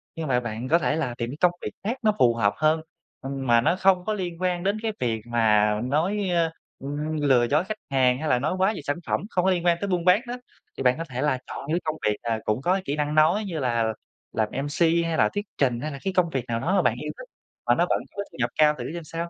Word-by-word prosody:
nhưng 160 -1 -4
mà 125 -2 +2
bạn 120 0 -5
có 170 - +5
thể 145 0 0
là 130 -7 -2
tìm 120 0 -3
cái 140 - -7
công 180 - +5
việc - - -4
khác 235 +6 -2
nó 215 - +5
phù 120 -1 +5
hợp 105 -3 +2
hơn, 155 +1 +2 0.4
ừm, 135 -1 -5
mà 120 0 +5
nó 165 +7 +2
không 185 -1 +3
có 215 - 0
liên 180 -4 -4
quan 180 -1 0
đến 200 +2 +1
cái 225 - 0
việc 115 -3 -1
mà 105 -3 +3
nói, 185 +9 0
ơ, 170 -2 +1 0.3
ừm, 150 +3 -3
lừa 125 -4 +4
dối 150 +5 +2
khách 215 +2 -4
hàng, 130 -1 +3
hay 155 - -3
là 125 - +3
nói 155 +8 -1
quá 190 +3 +2
về - - -6
sản 145 +3 -2
phẩm, - - 0
không 180 -4 0
có 190 - +4
liên 175 -1 -1
quan 170 -1 +4
tới 200 - -1
buôn 180 -2 -1
bán 185 +5 +5
đó. 240 - -4 0.4
Thì 135 - -3
bạn 125 0 +4
có 165 - -3
thể 125 +1 -4
là 140 -3 +1
chọn - - -7
những 165 - +2
công 155 0 -1
việc, 105 - +2
à, 115 -1 -1
cũng 105 +5 0
có 180 +6 +2
cái 195 - 0
kỹ 145 - -1
năng 150 0 -1
nói 165 +8 +4
như 165 -5 -4
là 115 -3 0 0.4
làm 110 -1 0
MC, 145 +5 -4 0.2
hay 165 -1 -1
là - - +4
thuyết 205 +1 -2
trình, 125 -4 +1
hay 155 - -3
là 140 - -7
cái 190 -1 -1
công 180 -2 +2
việc 135 -6 -3
nào 115 -1 -1
đó 185 +10 0
mà 190 - +4
bạn - - +2
yêu - - -4
thích, - - -11 0.4
mà - - +4
nó - - +3
vẫn - - +2 0.2
có 200 - -2
thu - - -14
nhập 120 -1 +1
cao 150 -1 +5
thử 125 +6 -5
xem 170 - -6
sao. 165 +2 -5
155 Hz, 290 wpm, -25 LUFS, 125-180 Hz, 0.4 s, có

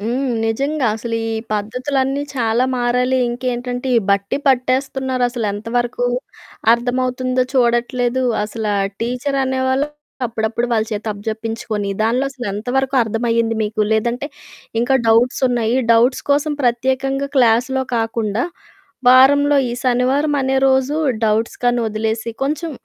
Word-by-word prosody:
హ్మ్, 245 +6 -1 0.2
నిజంగా 275 +5 0
అసలు 230 0 -3
ఈ - - -2 0.2
పద్ధతులన్నీ 260 +6 -1
చాలా 230 +1 +1
మారాలి 250 +1 +1
ఇంకేంటంటే, 245 +1 -3
ఈ - - +7
బట్టి 200 0 +1
పట్టేస్తున్నారు 260 0 +1
అసలు 240 -3 -3
ఎంతవరకు 240 +4 -2 0.7
అర్థమవుతుందో 255 +1 0
చూడట్లేదు. 245 0 +1 0.2
అసల 220 +1 -6 0.4
టీచరనేవాళ్ళు 260 +2 0 0.4
అప్పుడప్పుడు 225 +1 -2
వాళ్ళ 220 -2 +2
చేతి 210 +1 -3
అప్పజెప్పించుకొని 220 0 -4
దాంట్లో 240 +4 +1
అసలు 255 -4 -7
ఎంతవరకు 255 +6 -1
అర్థం 225 +1 -3
అయ్యింది 230 0 +1
మీకు? 215 0 -2
లేదంటే 235 +5 0 0.5
ఇంకా 245 +3 +2
డౌట్స్ 230 +3 +3
ఉన్నాయి 235 -1 0 0.2
డౌట్స్ 240 +3 +3
కోసం 290 +2 +2
ప్రత్యేకంగా 265 +3 0
క్లాస్‌లో 250 +2 +3
కాకుండా 225 -1 -1 0.7
వారంలో 285 +3 +6
ఈ - - -3
శనివారం 260 +4 +2
అనే 265 0 +1
రోజు 265 +2 +2 0.3
డౌట్స్ 220 +1 0
కనీ 245 0 +2
వదిలేసి, 220 +1 -2 0.2
కొంచెం 305 +4 -2
245 Hz, 120 wpm, -19 LUFS, 225-265 Hz, 0.7 s, ఈ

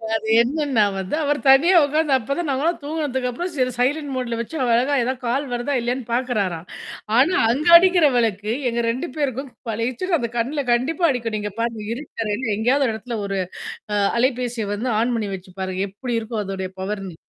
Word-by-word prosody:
அது 220 0 -3
என்னன்னா 270 -3 +1
வந்து 190 +9 -2
அவர் 290 0 0
தனியா 325 +7 +6
உட்காந்து 300 0 +1
அப்ப 270 +4 -3
தான் 345 -3 -2
நாங்கலாம் 295 +6 0
தூங்குனதுக்கப்புறம் 290 +1 -2
சரி 255 -1 +1
சைலன்ட் 285 +3 0
மோட்ல 240 -2 -2
வச்சு 235 +8 -5
அவர் 240 -2 +2
அழகா 260 +4 +1
ஏதாவது 260 +2 -2
கால் 270 +5 0
வருதா 245 +4 -2
இல்லையான்னு 245 +1 -2
பார்க்குறாராம். 205 -9 -1 0.5
ஆனா 300 +8 +4 0.2
அங்க 295 +6 -1
அடிக்கிற 360 -2 +4
விளக்கு 215 -2 0 0.2
எங்க 235 0 -1
2 255 +7 -2
பேருக்கும் 270 -2 -2 0.2
பழிச்சுன்னு 255 - -1
அந்த 235 - -2
கண்ணல 275 +5 -1
கண்டிப்பா 300 +9 +1
அடிக்கும். 230 -4 -2
நீங்க 210 -1 -4
பாருங்க 230 -2 -2
இருட்டு 245 -2 -5
அறையில 210 +1 -1
எங்கேயாவது 255 +3 +2
இடத்துல 225 +2 -5
ஒரு 195 0 -2 0.6
அ - - +1 0.2
அலைபேசிய 245 -4 0
வந்து 235 +5 -2
ஆன் 240 +2 +1
பண்ணி 210 -3 -2
வச்சு 185 0 -12
பாருங்க. 185 0 -3
எப்படி 235 +4 -4
இருக்கம் 220 -1 -4
அதொடைய 190 -1 -4
பவர்னு. 195 -2 -4
245 Hz, 175 wpm, -22 LUFS, 220-280 Hz, 0.6 s, தனியா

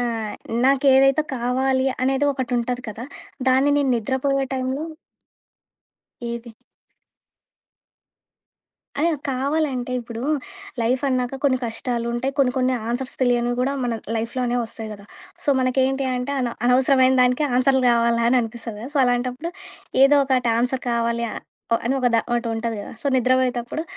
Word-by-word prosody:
ఆహ్, 230 -3 -2 0.3
నాకేదైతే 270 +1 +4
కావాలి 260 +2 +1 0.2
అనేది 270 +2 +1
ఒకటుంటది 250 -1 -2
కదా! 220 +3 -6 0.4
దాన్ని 265 +3 +4
నేను 275 -2 +1
నిద్రపోయే 265 +4 0
టైంలో 260 +3 -2 1.5
ఏది? 235 0 -7 2.5
అదే 335 +3 +2 0.2
కావాలంటే 270 -1 -1
ఇప్పుడు, 235 0 -7 0.6
లైఫ్ 250 +4 +1
అన్నాక 255 0 -1
కొన్ని 260 -2 +3
కష్టాలుంటాయి. 235 +2 -2
కొన్ని, 255 -2 +3
కొన్ని 255 0 +2 0.2
ఆన్సర్స్ 250 +2 -3
తెలియనివి 245 -1 +2
గూడా 270 +2 +1
మన 240 - -1 0.2
లైఫ్‌లో 230 +3 -3
అనేవొస్తాయి 230 -2 -3
కదా! 200 -1 -11 0.4
సో, - - -7
మనకేంటి 265 +1 +1
అంటే, 250 +3 -3
అన 245 - -1 0.2
అనవసరమైన 260 +1 +4
దానికి 250 +4 +2
ఆన్సర్లు 265 +1 +3
కావాలా 235 0 +2
అని 250 +1 +4
అనిపిస్తది 225 -1 -6
కదా! 255 +5 -7
సో, - - +3
అలాంటప్పుడు, 250 +6 -1 0.5
ఏదో 285 +1 +6
ఒకటి 255 -3 +2
ఆన్సర్ 250 +1 0
కావాలి 235 0 0
అ - - -6 0.5
అనొక 260 0 +1
ద - - +6
ఒకటుంటధి 230 -1 -1
కదా! - - -9
సో, - - -3
నిద్రపోయేతప్పుడు, 255 +2 +1
250 Hz, 130 wpm, -22 LUFS, 235-265 Hz, 2.5 s, ఏదో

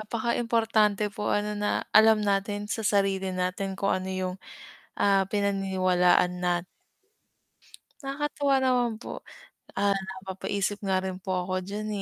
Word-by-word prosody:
napakaimportante 220 -2 +1
po 210 0 -3
ano 210 0 0
na 205 0 -1
alam 220 -1 +6
natin 205 +1 0
sa 225 - -3
sarili 195 -2 +1
natin 185 +1 -2
kung 195 - +1
ano 185 - -6
'yung, 185 -1 -2 0.6
ah, 195 -1 +3
pinaniniwalaan 190 -3 +2
nat 175 -1 0 1.4
Nakakatuwa 280 0 0
naman 245 -4 +1
po, - - -8 0.5
ah, 200 0 +1
napapaisip 190 +1 -3
nga 190 -1 +1
rin 190 -1 -4
po 185 0 -5 0.2
ako 185 0 -2
diyan, 210 +3 -5
200 Hz, 125 wpm, -27 LUFS, 190-215 Hz, 1.4 s, alam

